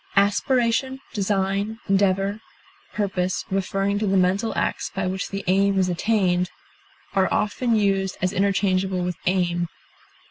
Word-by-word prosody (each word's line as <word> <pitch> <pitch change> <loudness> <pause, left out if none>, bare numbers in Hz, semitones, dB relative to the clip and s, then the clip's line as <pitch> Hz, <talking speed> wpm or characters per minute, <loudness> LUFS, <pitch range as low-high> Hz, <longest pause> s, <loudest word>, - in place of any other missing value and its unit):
Aspiration, 235 +5 +2
design, 200 +1 0
endeavor, 195 +1 +1 0.5
purpose, 185 -3 -1
referring 195 +1 0
to 215 - 0
the 195 0 +2
mental 190 +5 +2
acts - - -1
by 190 -1 -3
which 190 +1 -2
the 195 0 -4
aim 195 +2 +3
is 185 -1 +2
attained, 180 -1 +1 0.6
are 190 -1 +2
often 230 +3 +1
used 195 -2 +1
as 185 +1 0
interchangeable 190 -1 +1
with 180 -1 -3
aim. 175 -2 +1
195 Hz, 130 wpm, -23 LUFS, 185-205 Hz, 0.6 s, aim